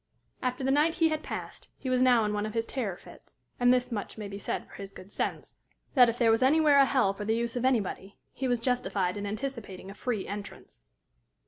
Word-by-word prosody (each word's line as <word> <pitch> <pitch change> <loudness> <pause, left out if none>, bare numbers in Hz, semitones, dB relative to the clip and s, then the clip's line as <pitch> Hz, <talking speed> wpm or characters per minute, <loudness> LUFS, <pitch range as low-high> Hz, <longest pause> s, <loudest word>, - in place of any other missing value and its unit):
After 255 +1 -2
the 265 - +2
night 300 +4 +3
he 330 -2 +3
had 310 -1 -1
passed, - - -7
he 265 - -7
was 255 -1 +2
now 245 -3 +5
in 210 - -1
one 210 +1 -1
of 215 - -7
his 225 0 0
terror 220 -8 -3
fits; - - -16 0.2
and 245 0 +5
this 250 0 +2
much 210 -1 -4
may 210 -1 -5
be 200 0 -7
said - - -3
for - - -18
his 195 -1 -8
good 195 +1 -13
sense - - -3 0.4
that, 250 -4 +7
if 230 - -3
there 235 -2 +4
was 225 - +2
anywhere 290 +2 +5
a 275 - +7
hell 255 -8 +2
for 210 - -6
the 220 +2 +1
use 235 +1 -2
of 245 0 -1
anybody, 205 -5 0 0.2
he 265 - -2
was 245 -1 +1
justified 225 -7 0
in 205 0 -4
anticipating 210 -5 -5
a - - -9
free 220 -1 -3
entrance. 200 - -8
235 Hz, 235 wpm, -29 LUFS, 205-260 Hz, 0.4 s, that